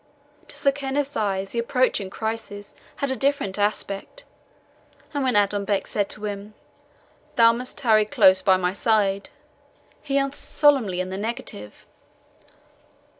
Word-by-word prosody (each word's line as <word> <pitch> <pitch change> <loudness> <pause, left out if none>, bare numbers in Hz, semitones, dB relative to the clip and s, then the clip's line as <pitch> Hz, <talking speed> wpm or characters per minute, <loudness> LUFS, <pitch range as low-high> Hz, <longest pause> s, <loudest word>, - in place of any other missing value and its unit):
To - - -11
Sir 280 - +3
Kenneth's 280 +1 -3
eyes 195 -2 -1
the 235 - -2
approaching 235 -4 +1
crisis 220 -1 -5 0.2
had 280 -1 -2
a - - 0
different 270 -8 -1
aspect, 205 - -2 0.9
and 285 -1 -1
when 255 -3 +1
Adonbec 200 -1 +1
said 205 -1 -2
to 215 - -6
him, 205 +1 -6 0.8
"Thou 230 0 +6
must 250 +2 -6
tarry 220 -5 +3
close 190 -2 +5
by 190 -2 +4
my 180 0 -1
side," 200 -2 +1 0.7
he 280 -2 -1
answered 275 0 -1
solemnly 250 -12 +2
in 185 0 -5
the 190 - -4
negative. 205 - -6
215 Hz, 135 wpm, -24 LUFS, 195-260 Hz, 0.9 s, Thou